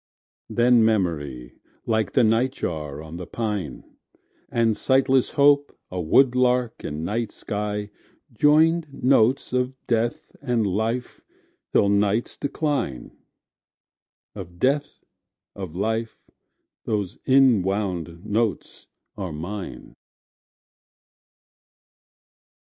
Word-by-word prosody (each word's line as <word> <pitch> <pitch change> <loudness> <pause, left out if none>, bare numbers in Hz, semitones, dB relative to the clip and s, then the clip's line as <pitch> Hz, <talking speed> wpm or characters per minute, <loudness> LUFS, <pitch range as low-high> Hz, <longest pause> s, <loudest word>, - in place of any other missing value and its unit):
Then 120 -1 +4
memory, 75 - -1 0.3
like 110 -1 0
the 125 - +4
nightjar 90 - -1
on 80 +1 -8
the 90 - -7
pine, 105 - -4 0.7
And 115 -2 +2
sightless 130 +1 +2
hope, 145 0 +3
a 90 -1 -3
woodlark 125 +5 +2
in 75 +2 -4
night 115 +4 -2
sky, 105 0 -4 0.4
Joined 155 +5 +3
notes 130 -1 +2
of 125 +1 0
Death 115 0 -1
and 120 -5 0
Life 110 +6 -2 0.5
till 100 - +4
night's 100 +3 +1
decline 140 - -3 1.2
Of 90 -4 -9
Death, 140 +6 -1 0.5
of 95 -5 -7
Life, 110 +3 -3 0.5
those 105 -2 -2
inwound 95 -9 +2
notes 110 -1 -2 0.3
are 95 -4 -5
mine. 90 +6 -7
110 Hz, 90 wpm, -24 LUFS, 95-125 Hz, 1.2 s, Then